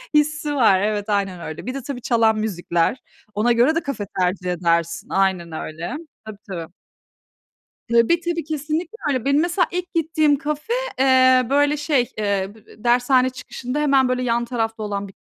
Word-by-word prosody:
hissi 300 0 +1
var. 220 -8 +4
Evet, 210 0 -1
aynen 195 -3 -1
öyle. 155 +3 -7
Bir 255 - -3
de 275 - -5
tabii 255 -1 -6
çalan 225 -3 +2
müzikler. 175 0 -1 0.3
Ona 220 +4 +2
göre 245 +7 +3
de 330 - 0
kafe 260 -8 -4
tercih 180 0 0
edersin. 170 -1 0
Aynen 190 -3 0
öyle. 160 - -5 0.3
Tabii, 215 -2 -9
tabii. 170 -2 -6 1.2
Tabii, 235 +9 +4
tabii 340 -2 -2
kesinlikle 315 +6 -3
öyle. 260 -4 0
Benim 280 +2 +3
mesela 350 +2 +1
ilk 360 0 -4
gittiğim 310 -2 +2
kafe, 300 - -3 0.3
eee, 260 -1 +5
böyle 290 +1 +3
şey, 290 -4 0
eee, 200 -2 0
b 220 - -17
eee, 215 - -17
dershane 250 +2 +3
çıkışında 255 +1 -6
hemen, 275 -3 +3
böyle, 255 0 0
yan 240 -1 +1
tarafta 225 -2 -3
olan 200 -1 -3
bir 190 - -15
245 Hz, 170 wpm, -21 LUFS, 200-290 Hz, 1.2 s, eee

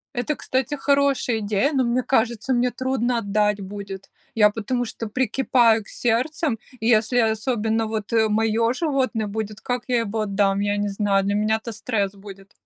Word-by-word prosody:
Это, 250 +5 -1
кстати, 265 +2 -2
хорошая 280 -4 +1
идея, 210 +6 0
но 265 -2 +2
мне 245 +1 0
кажется, 240 +1 0
мне 245 0 +2
трудно 250 -1 -1
отдать 210 -1 0
будет. 195 0 -8 0.3
Я 210 -2 +6
потому 230 +4 -2
что 225 0 -6
прикипаю 240 -1 +2
к - - -19
сердцем, 250 +3 0 0.2
и 225 - -2
если 230 +1 +3
особенно 225 0 0
вот, 215 0 -4
э, 220 -1 +4
моё 225 +2 +2
животное 260 -7 -1
будет, 215 0 -5
как 245 -1 -2
я 245 -2 +2
его 220 -1 -2
отдам, 200 -1 +1
я 205 0 0
не 205 0 -1
знаю, 195 -1 +1
для 200 +1 0
меня 215 +1 +2
это 230 - -6
стресс 210 -3 -2
будет. 195 -1 -13
225 Hz, 175 wpm, -23 LUFS, 210-250 Hz, 0.3 s, Я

